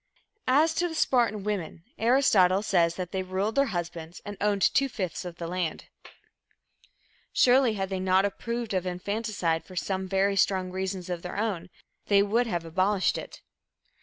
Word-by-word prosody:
As 300 Hz, +5 st, +4 dB
to 350 Hz, +2 st, 0 dB
the 325 Hz, -, -6 dB
Spartan 235 Hz, -8 st, +2 dB
women, 190 Hz, -5 st, -4 dB, 0.2 s
Aristotle 215 Hz, -6 st, +4 dB
says 170 Hz, -5 st, +2 dB
that 180 Hz, -1 st, -5 dB
they 190 Hz, -, -1 dB
ruled 190 Hz, +4 st, -2 dB
their 275 Hz, +2 st, +3 dB
husbands 170 Hz, -3 st, -5 dB
and 205 Hz, 0 st, -6 dB
owned 205 Hz, -2 st, +1 dB
two 275 Hz, 0 st, +3 dB
fifths 185 Hz, -6 st, -4 dB
of 175 Hz, -1 st, -6 dB
the 170 Hz, -, -5 dB
land. 175 Hz, -2 st, -3 dB, 1.4 s
Surely, 250 Hz, -2 st, +4 dB
had 195 Hz, -1 st, -2 dB
they 190 Hz, -1 st, -2 dB
not 185 Hz, +1 st, +3 dB
approved 235 Hz, +2 st, -3 dB
of 185 Hz, -1 st, -1 dB
infanticide 180 Hz, -2 st, -2 dB
for 185 Hz, -, -13 dB
some 190 Hz, +1 st, -2 dB
very 195 Hz, +1 st, +1 dB
strong 190 Hz, -1 st, +1 dB
reasons 190 Hz, -1 st, -3 dB
of 175 Hz, -1 st, -3 dB
their 180 Hz, -, -6 dB
own, 195 Hz, -5 st, -2 dB, 0.4 s
they 200 Hz, -1 st, +5 dB
would 230 Hz, +4 st, +1 dB
have 175 Hz, -6 st, -2 dB
abolished 185 Hz, +4 st, +1 dB
it. -, -, -8 dB
195 Hz, 165 wpm, -27 LUFS, 180-215 Hz, 1.4 s, they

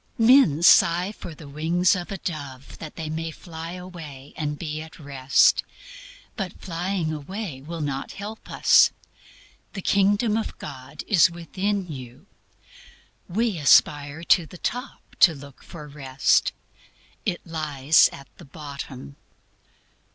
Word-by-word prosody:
Men 225 Hz, -, +5 dB
sigh 175 Hz, +2 st, +5 dB
for 170 Hz, -6 st, -9 dB
the 150 Hz, -1 st, -12 dB
wings 165 Hz, +6 st, +2 dB
of 180 Hz, +2 st, -6 dB
a 195 Hz, -, -3 dB
dove 140 Hz, -7 st, -7 dB
that 155 Hz, -, -9 dB
they 160 Hz, -, -5 dB
may 160 Hz, +1 st, -3 dB
fly 165 Hz, +1 st, -8 dB
away 165 Hz, -7 st, -10 dB
and 150 Hz, -1 st, -3 dB
be 155 Hz, -1 st, -5 dB
at 160 Hz, 0 st, -11 dB
Rest. 140 Hz, -2 st, +3 dB, 0.7 s
But 195 Hz, -6 st, -5 dB
flying 175 Hz, -1 st, -2 dB
away 155 Hz, -1 st, -6 dB
will 165 Hz, +3 st, -6 dB
not 140 Hz, -2 st, -4 dB
help 210 Hz, +2 st, -8 dB
us. -, -, +5 dB, 0.8 s
"The 195 Hz, -, -5 dB
Kingdom 205 Hz, +3 st, +2 dB
of 225 Hz, -, -4 dB
God 140 Hz, 0 st, -9 dB
is 185 Hz, -4 st, +5 dB
within 185 Hz, +4 st, -3 dB
you." 130 Hz, -6 st, -9 dB, 1.0 s
We 210 Hz, -1 st, 0 dB
aspire 145 Hz, +2 st, +3 dB
to 170 Hz, -1 st, +3 dB
the 180 Hz, -, -12 dB
top 245 Hz, +9 st, -4 dB, 0.2 s
to 165 Hz, -4 st, +6 dB
look 140 Hz, -1 st, -13 dB
for 150 Hz, -3 st, -10 dB
Rest; 135 Hz, -2 st, +1 dB, 0.7 s
it 175 Hz, -, -3 dB
lies 155 Hz, -3 st, +3 dB
at 140 Hz, -1 st, -11 dB
the -, -, -12 dB
bottom. 140 Hz, -, -9 dB
160 Hz, 135 wpm, -24 LUFS, 145-185 Hz, 1.0 s, to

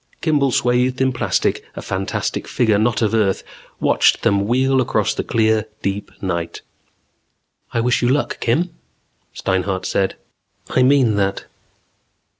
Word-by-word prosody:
Kimball, 145 Hz, -4 st, +2 dB
swathed 125 Hz, +1 st, +1 dB
in 130 Hz, 0 st, +2 dB
plastic, 120 Hz, -, 0 dB
a -, -, -6 dB
fantastic 95 Hz, 0 st, -3 dB
figure 110 Hz, -5 st, +2 dB
not 115 Hz, +1 st, +1 dB
of 110 Hz, -, +1 dB
earth, 105 Hz, -4 st, +1 dB, 0.4 s
watched -, -, +3 dB
them 100 Hz, 0 st, +2 dB
wheel 130 Hz, +2 st, +2 dB
across 125 Hz, -, 0 dB
the -, -, -3 dB
clear, 110 Hz, -1 st, +1 dB, 0.2 s
deep 100 Hz, +1 st, -3 dB
night. 85 Hz, -3 st, -3 dB, 1.1 s
"I 115 Hz, -, 0 dB
wish 125 Hz, +1 st, +1 dB
you 120 Hz, -, +2 dB
luck, 145 Hz, +3 st, 0 dB
Kim," 165 Hz, +10 st, 0 dB, 0.6 s
Steinhart 95 Hz, 0 st, -1 dB
said. 95 Hz, -1 st, 0 dB, 0.6 s
"I 130 Hz, -, +2 dB
mean 130 Hz, -5 st, +4 dB
that." 100 Hz, -1 st, -1 dB
115 Hz, 135 wpm, -20 LUFS, 100-130 Hz, 1.1 s, mean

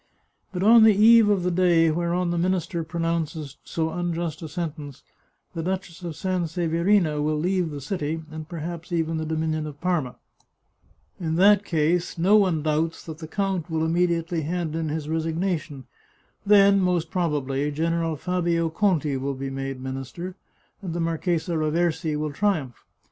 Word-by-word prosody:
But 185 Hz, -1 st, -3 dB
on 225 Hz, +2 st, +7 dB
the 220 Hz, -2 st, +6 dB
eve 220 Hz, +1 st, +7 dB
of 200 Hz, -3 st, +2 dB
the 180 Hz, -, +1 dB
day 170 Hz, -2 st, +4 dB
whereon 170 Hz, +2 st, 0 dB
the 175 Hz, -, -1 dB
minister 175 Hz, -2 st, -1 dB
pronounces 165 Hz, -3 st, -3 dB
so 160 Hz, -1 st, -2 dB
un 175 Hz, -1 st, -2 dB
just 165 Hz, -2 st, -4 dB
a 160 Hz, -, -6 dB
sentence, 150 Hz, -4 st, -6 dB, 0.5 s
the 165 Hz, -, -3 dB
Duchess 180 Hz, 0 st, -4 dB
of 170 Hz, -2 st, -5 dB
Sanseverina 170 Hz, -1 st, +1 dB
will 155 Hz, +1 st, 0 dB
leave 180 Hz, +1 st, 0 dB
the 145 Hz, -2 st, -6 dB
city, 160 Hz, +1 st, -3 dB
and 155 Hz, 0 st, -8 dB
perhaps 170 Hz, +1 st, -6 dB
even 165 Hz, -1 st, 0 dB
the 160 Hz, 0 st, -3 dB
dominion 155 Hz, -1 st, -1 dB
of 145 Hz, -1 st, -9 dB
Parma. 170 Hz, -8 st, -1 dB, 1.0 s
In 160 Hz, -2 st, -2 dB
that 200 Hz, +3 st, +5 dB
case, 170 Hz, 0 st, 0 dB
no 185 Hz, +5 st, +4 dB
one 185 Hz, -7 st, +3 dB
doubts 155 Hz, +1 st, -1 dB
that 160 Hz, -1 st, -8 dB
the 160 Hz, -, -7 dB
count 190 Hz, -2 st, -2 dB
will 160 Hz, 0 st, 0 dB
immediately 170 Hz, 0 st, 0 dB
hand 165 Hz, 0 st, -3 dB
in 160 Hz, -1 st, -2 dB
his 150 Hz, 0 st, -3 dB
resignation. 160 Hz, -3 st, -2 dB, 0.6 s
Then, 200 Hz, -1 st, +6 dB
most 180 Hz, -3 st, 0 dB
probably, 145 Hz, -5 st, -1 dB
General 165 Hz, +2 st, -1 dB
Fabio 170 Hz, 0 st, 0 dB
Conti 160 Hz, -6 st, +1 dB
will 135 Hz, +1 st, -3 dB
be 135 Hz, +1 st, -5 dB
made 135 Hz, -1 st, -4 dB
minister, 135 Hz, +8 st, -6 dB, 0.5 s
and 175 Hz, -4 st, -5 dB
the -, -, -2 dB
Marchesa 165 Hz, +1 st, -1 dB
Raversi 160 Hz, 0 st, 0 dB
will 150 Hz, -1 st, -3 dB
triumph. 155 Hz, -, -1 dB
165 Hz, 160 wpm, -24 LUFS, 155-180 Hz, 1.0 s, on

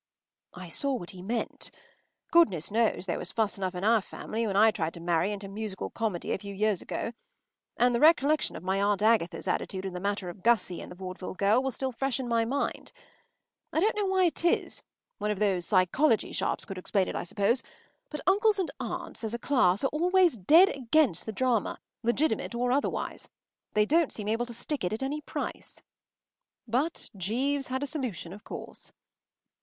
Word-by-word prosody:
” -, -, -56 dB
I -, -, -10 dB
saw 275 Hz, -, 0 dB
what 175 Hz, -8 st, -6 dB
he 185 Hz, -, -11 dB
meant. 230 Hz, +5 st, -3 dB, 0.6 s
Goodness 200 Hz, -, +4 dB
knows 225 Hz, -3 st, +1 dB
there 175 Hz, -, -2 dB
was -, -, -4 dB
fuss 215 Hz, -3 st, 0 dB
enough 185 Hz, -1 st, -2 dB
in 180 Hz, -, -4 dB
our 225 Hz, +1 st, +4 dB
family 225 Hz, +3 st, -4 dB
when 195 Hz, -, -2 dB
I 220 Hz, +2 st, +6 dB
tried 165 Hz, -6 st, -3 dB
to -, -, -8 dB
marry 175 Hz, +3 st, +1 dB
into 205 Hz, -1 st, -5 dB
musical 200 Hz, -1 st, -5 dB
comedy 215 Hz, -7 st, -2 dB
a -, -, -1 dB
few 200 Hz, 0 st, -8 dB
years 210 Hz, -2 st, +1 dB
ago. 230 Hz, -, -4 dB, 0.6 s
And 245 Hz, 0 st, +4 dB
the 235 Hz, -, +1 dB
recollection 305 Hz, -1 st, +4 dB
of -, -, -8 dB
my 190 Hz, +1 st, 0 dB
Aunt 205 Hz, 0 st, +1 dB
Agatha’s 220 Hz, -6 st, +2 dB
attitude 190 Hz, 0 st, -2 dB
in 190 Hz, -, -4 dB
the 180 Hz, -, -4 dB
matter 200 Hz, 0 st, -2 dB
of 175 Hz, +2 st, -8 dB
Gussie 225 Hz, -6 st, +2 dB
and -, -, -9 dB
the -, -, -9 dB
vaudeville 185 Hz, 0 st, -7 dB
girl 205 Hz, +6 st, +3 dB
was 265 Hz, -2 st, -2 dB
still 265 Hz, -1 st, -2 dB
fresh 270 Hz, +1 st, -1 dB
in 255 Hz, -, -3 dB
my 230 Hz, -1 st, +2 dB
mind. 275 Hz, +5 st, -2 dB, 0.8 s
I -, -, +1 dB
don’t 425 Hz, +6 st, +2 dB
know 415 Hz, -2 st, 0 dB
why 380 Hz, -1 st, +3 dB
it 335 Hz, -, -1 dB
is—one 345 Hz, -, -2 dB
of 210 Hz, -, 0 dB
these 190 Hz, -4 st, +1 dB
psychology 215 Hz, -, +3 dB
sharps -, -, -1 dB
could 195 Hz, -1 st, -6 dB
explain 190 Hz, +1 st, 0 dB
it, -, -, -4 dB
I -, -, -1 dB
suppose—but 235 Hz, -, -3 dB
uncles 415 Hz, +2 st, +4 dB
and 375 Hz, -3 st, -1 dB
aunts, -, -, -5 dB
as 220 Hz, +1 st, -2 dB
a -, -, -2 dB
class, 235 Hz, -7 st, +2 dB
are -, -, +4 dB
always 355 Hz, 0 st, +4 dB
dead 315 Hz, -, +6 dB
against 260 Hz, -, +1 dB
the -, -, -2 dB
drama, 240 Hz, 0 st, 0 dB, 0.2 s
legitimate 240 Hz, +2 st, 0 dB
or 245 Hz, +1 st, 0 dB
otherwise. 280 Hz, +3 st, -1 dB, 0.5 s
They 210 Hz, 0 st, +4 dB
don’t 320 Hz, +4 st, +3 dB
seem 210 Hz, -1 st, -5 dB
able 230 Hz, +2 st, 0 dB
to 240 Hz, -, -7 dB
stick 285 Hz, +2 st, -3 dB
it 180 Hz, +3 st, -1 dB
at 220 Hz, -, -3 dB
any 290 Hz, +3 st, -2 dB
price. -, -, -6 dB, 0.8 s
But 265 Hz, +9 st, -1 dB
Jeeves 255 Hz, +9 st, -1 dB
had 260 Hz, +2 st, -2 dB
a -, -, 0 dB
solution, 250 Hz, -, -4 dB
of 205 Hz, -, -12 dB
course. -, -, -8 dB
225 Hz, 195 wpm, -29 LUFS, 195-275 Hz, 0.8 s, I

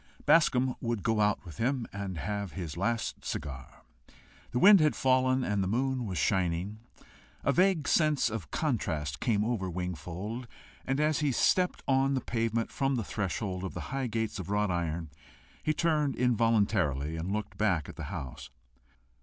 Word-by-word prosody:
Bascombe 130 Hz, -6 st, +4 dB
would 115 Hz, -5 st, -2 dB
go 110 Hz, -1 st, +2 dB
out 105 Hz, -1 st, +1 dB
with 80 Hz, -4 st, -10 dB
him 125 Hz, 0 st, 0 dB
and 100 Hz, -3 st, -4 dB
have 100 Hz, +3 st, -3 dB
his 85 Hz, -5 st, -5 dB
last 110 Hz, +6 st, -2 dB
cigar. 65 Hz, -3 st, -6 dB, 0.7 s
The -, -, -2 dB
wind 200 Hz, +7 st, +8 dB
had 155 Hz, -1 st, +3 dB
fallen, 130 Hz, 0 st, +3 dB
and 105 Hz, -4 st, 0 dB
the -, -, -1 dB
moon 125 Hz, +3 st, 0 dB
was 95 Hz, -3 st, -3 dB
shining. 95 Hz, +4 st, 0 dB, 0.6 s
A -, -, +3 dB
vague 180 Hz, -5 st, +3 dB
sense 155 Hz, -5 st, +3 dB
of 110 Hz, -10 st, -5 dB
contrast 80 Hz, -, -1 dB
came 110 Hz, -4 st, +1 dB
over 110 Hz, -6 st, -1 dB
Wingfold, 90 Hz, -, -5 dB, 0.4 s
and 135 Hz, +2 st, 0 dB
as 150 Hz, -1 st, +2 dB
he 150 Hz, -2 st, +1 dB
stepped 180 Hz, +8 st, +2 dB
on 135 Hz, 0 st, +3 dB
the -, -, +1 dB
pavement 115 Hz, -1 st, -1 dB
from 135 Hz, 0 st, 0 dB
the 115 Hz, -, -1 dB
threshold 95 Hz, -1 st, -3 dB
of 95 Hz, -, -5 dB
the -, -, -6 dB
high 135 Hz, -2 st, -1 dB
gates 110 Hz, -2 st, -2 dB
of 95 Hz, -, -6 dB
wrought 105 Hz, -1 st, +1 dB
iron, 85 Hz, -2 st, -2 dB, 0.5 s
he 155 Hz, -, +1 dB
turned 150 Hz, -3 st, +1 dB
involuntarily 100 Hz, -, +2 dB
and 85 Hz, +4 st, -3 dB
looked 105 Hz, 0 st, -4 dB
back 95 Hz, -9 st, +1 dB
at -, -, -9 dB
the 80 Hz, -, -6 dB
house. 70 Hz, -6 st, -7 dB
110 Hz, 170 wpm, -30 LUFS, 90-130 Hz, 0.7 s, wind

